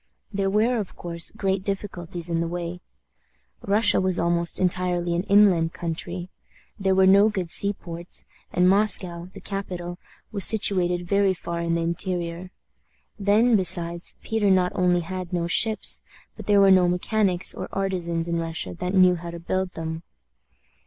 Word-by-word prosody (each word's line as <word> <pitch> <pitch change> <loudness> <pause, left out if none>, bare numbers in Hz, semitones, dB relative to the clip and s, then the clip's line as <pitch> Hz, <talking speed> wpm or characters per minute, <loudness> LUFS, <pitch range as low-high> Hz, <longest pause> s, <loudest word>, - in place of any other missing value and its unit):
There 195 -1 0
were, 225 +4 +1
of 200 - -6
course, 170 -1 -4
great 195 -2 -1
difficulties 180 -4 -4
in 170 -1 -1
the 170 - -1
way. 175 +1 -5 0.8
Russia 210 +1 +4
was 185 -1 +1
almost 170 0 0
entirely 180 -1 0
an 175 - 0
inland 190 -5 +4
country. 175 +2 -5 0.5
There 190 -1 +1
were 190 0 +4
no 200 +3 +6
good 185 -5 -4
sea 200 0 +4
ports, 170 -2 -6 0.3
and 180 0 +2
Moscow, 185 -3 +1
the - - -8
capital, 180 -3 -6 0.3
was 200 -2 0
situated 180 -5 +2
very 200 0 +2
far 170 0 -5
in 170 0 -1
the 170 - -1
interior. 175 0 -3 0.7
Then, 215 +4 +3
besides, 175 -3 +3
Peter 220 -2 0
not 185 -1 +3
only 180 -1 +1
had 185 0 -6
no 175 -2 -1
ships, 215 +5 0 0.3
but - - -11
there 205 -1 +4
were 195 -1 +6
no 185 -1 +5
mechanics 185 +1 +1
or - - -7
artisans 175 -4 -2
in 170 0 -1
Russia 165 - -3
that 180 - -4
knew 185 -1 +6
how 170 +1 -8
to 170 0 -8
build 185 +2 -3
them. 160 0 -5
180 Hz, 160 wpm, -24 LUFS, 170-195 Hz, 0.8 s, no